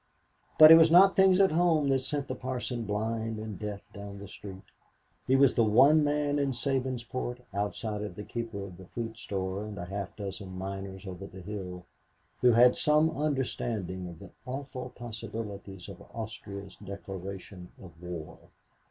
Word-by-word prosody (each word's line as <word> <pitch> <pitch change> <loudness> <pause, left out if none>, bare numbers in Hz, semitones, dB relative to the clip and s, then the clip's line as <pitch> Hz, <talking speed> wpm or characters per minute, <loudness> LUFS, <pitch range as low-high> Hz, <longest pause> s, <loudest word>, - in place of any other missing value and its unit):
But 155 0 +11
it 165 - +11
was 160 0 +7
not 190 +4 +7
things 190 -1 +6
at 195 -3 +5
home 160 -3 +3
that 135 -1 +3
sent 140 +1 -3
the - - -3
parson 125 -2 -4
blind 110 +2 -2
and 110 -2 -6
deaf 105 -2 -5
down 100 0 -8
the 100 0 -9
street. 95 -1 -10 0.6
He 130 - +4
was 135 -1 +5
the 115 - +3
one 135 +8 +6
man 145 0 +1
in 140 -2 +1
Sabinsport, 130 -2 -2
outside 105 +1 -2
of 105 - -5
the 105 - -6
keeper 115 -3 -5
of 90 -3 -9
the 95 -1 -12
fruit 115 +1 -5
store 95 -2 -3
and 105 -1 -7
a 85 - -5
half 100 +2 -5
dozen 95 -2 -6
miners 95 0 -6
over 95 +1 -7
the 95 -1 -11
hill, 90 -2 -6 0.5
who 125 -1 +5
had 125 +2 +6
some 150 +2 +3
understanding 120 - -2
of 85 -2 -9
the - - -12 0.2
awful 130 -1 -5
possibilities 105 -5 -7
of 100 -3 -10
Austria's 100 -3 -7
declaration 95 -2 -8
of 95 - -11
war. 90 -3 -7
110 Hz, 170 wpm, -30 LUFS, 100-130 Hz, 0.6 s, But